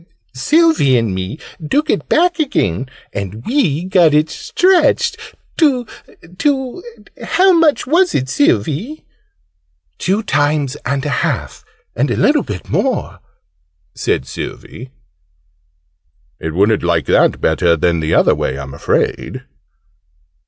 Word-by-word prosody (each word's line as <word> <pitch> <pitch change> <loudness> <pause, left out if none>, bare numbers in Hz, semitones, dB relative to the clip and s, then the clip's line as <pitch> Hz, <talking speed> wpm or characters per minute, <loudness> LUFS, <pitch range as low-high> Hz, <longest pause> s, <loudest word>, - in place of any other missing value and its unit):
Sylvie 220 - +3
and 115 -4 0
me 95 +8 -4 0.3
took 300 +2 +1
it - - -1
back 350 +1 +2
again 130 - -1 0.2
and 100 +3 -6
we 180 - 0
got 180 -5 +3
it 155 +1 +2
stretched 365 0 +2 0.4
to 270 -7 +2 0.5
to 270 +2 -1 0.4
how 380 +1 +3
much 325 -3 +3
was 350 +7 +2
it, 130 - 0
Sylvie?" 285 - 0 0.9
"Two 200 +5 0
times 145 -6 0
and 140 +2 -2
a - - -1
half, 65 -5 -3 0.3
and - - 0
a - - -1
little - - +3
bit - - -7
more," - - -1 0.7
said 65 - -1
Sylvie. 115 - -8 1.5
"It 80 -1 -5
wouldn't 105 +3 +2
like 85 -3 0
that - - +2
better 85 +2 +2
than 85 +1 +1
the 80 0 0
other - - +4
way, 65 - -2
I'm 70 -1 -7
afraid?" 70 - -2
150 Hz, 125 wpm, -16 LUFS, -, 1.5 s, other